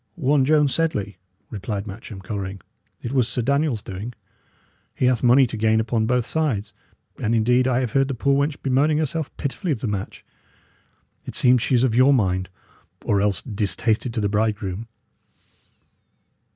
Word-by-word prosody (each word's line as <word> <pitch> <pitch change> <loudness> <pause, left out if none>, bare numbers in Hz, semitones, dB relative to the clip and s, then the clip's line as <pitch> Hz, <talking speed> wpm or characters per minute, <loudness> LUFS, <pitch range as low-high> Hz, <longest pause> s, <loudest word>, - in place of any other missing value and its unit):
"One 140 -4 +2
Joan 150 0 +4
Sedley," 120 - -1 0.3
replied 100 -1 -4
Matcham, 100 -1 -9
colouring. 95 -1 -5 0.4
"It 120 - -4
was 125 -4 +2
Sir 125 - -1
Daniel's 140 -3 0
doing; 100 +6 -6 0.8
he - - 0
hath 125 -3 +2
money 125 +2 +6
to 115 - -5
gain 110 0 +2
upon 110 0 0
both 125 -1 +1
sides; 125 -10 -1 0.5
and, 115 +2 0
indeed, 125 +3 +3
I 130 0 +2
have 125 -4 -2
heard 135 +2 +2
the 135 - -3
poor 140 +4 +1
wench 140 +1 0
bemoaning 140 +3 +2
herself 155 0 -1
pitifully 140 +5 -3
of 135 - -1
the - - -2
match. 100 -3 -4 1.0
It - - -6
seems 125 -1 +4
she 130 - +1
is 120 - +3
of 125 -4 +2
your 130 +4 +5
mind, 95 -5 0 0.6
or 100 -1 +2
else 100 -2 0
distasted 110 +2 -1
to 110 - 0
the 100 - +1
bridegroom." 105 0 -1
120 Hz, 165 wpm, -23 LUFS, 105-135 Hz, 1.0 s, money